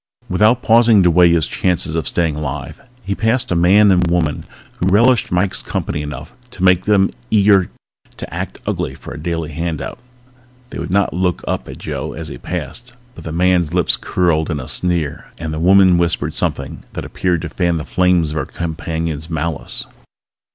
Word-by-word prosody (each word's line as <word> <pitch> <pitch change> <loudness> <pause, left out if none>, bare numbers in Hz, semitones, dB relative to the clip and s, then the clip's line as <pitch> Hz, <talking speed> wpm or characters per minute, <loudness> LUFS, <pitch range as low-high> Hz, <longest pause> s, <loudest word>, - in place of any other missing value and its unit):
Without 105 +6 +3
pausing 115 -3 +5
to 90 - +4
weigh 90 +1 +6
his 85 -2 +3
chances 90 -3 -1
of 80 - -1
staying 80 -3 0
alive 70 -3 -5 0.2
he 100 - -1
passed 110 +3 0
a - - +2
man 100 +4 +5
and 90 -1 +3
a 85 - 0
woman 80 -4 0 0.3
who 90 - 0
relished 115 +5 +3
Mike's 90 +2 0
company 75 - -3
enough 75 - -7 0.2
to 95 -6 -7
make 90 -1 +4
them 100 -2 +3 0.2
eager 100 -3 +4 0.5
to - - -8
act - - -5
ugly 65 - -2
for - - -10
a - - -8
daily 80 -1 -3
handout. 80 -2 -4 0.7
They - - -7
did - - -4
not 100 +2 +1
look 90 0 -1
up - - -2
at - - -8
Joe - - -5
as 80 -2 -7
he - - -8
passed 120 0 -6 0.2
but 85 - -12
the 80 - -4
man's 90 -1 +1
lips 90 - +3
curled 85 -3 0
in 75 -3 -2
a 65 - -7
sneer 85 -5 -2
and 80 -2 -5
the 80 - -3
woman 95 0 +5
whispered 85 -1 0
something - - -3
that - - -5
appeared 90 -3 -1
to 80 - -4
fan 85 0 0
the 75 - -5
flames 90 -4 +2
of 75 - -4
her 70 - -2
companion's 80 -1 -4
malice. 80 -2 -3
85 Hz, 190 wpm, -18 LUFS, 80-95 Hz, 0.7 s, weigh